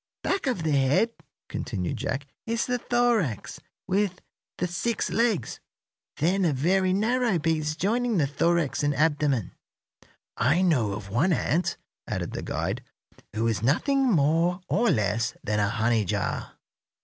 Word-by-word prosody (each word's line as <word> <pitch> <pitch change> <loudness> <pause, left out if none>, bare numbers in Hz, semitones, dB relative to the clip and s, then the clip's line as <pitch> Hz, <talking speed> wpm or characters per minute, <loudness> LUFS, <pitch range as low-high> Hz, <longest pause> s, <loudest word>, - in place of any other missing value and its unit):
"Back 380 -5 0
of 240 -10 -1
the 160 - 0
head," 140 - +3 0.4
continued 95 -7 -3
Jack, 135 +1 -3 0.2
"is 230 +1 0
the 250 -1 -1
thorax, 235 - 0 0.3
with 190 -1 0 0.4
the - - 0
six 190 +6 -2
legs, 225 - 0 0.6
then 185 +6 +2
a 165 -4 +2
very 185 +7 +2
narrow 225 +1 +2
piece 155 -1 0
joining 225 +6 0
the 150 - +3
thorax 165 +2 +1
and 145 0 +1
abdomen." 145 - +1 0.8
"I 145 +10 +2
know 125 - +2
of 100 -1 -7
one 145 - +2
ant," 170 +1 0 0.3
added - - -3
the - - -4
guide, - - -3 0.5
"who 110 +1 0
is 110 -2 0
nothing 270 - +2
more 165 +2 +2
or 235 +2 +2
less 115 - 0
than 105 0 0
a 100 -1 +2
honey 115 0 +1
jar. 90 - -2
165 Hz, 145 wpm, -26 LUFS, 130-200 Hz, 0.8 s, head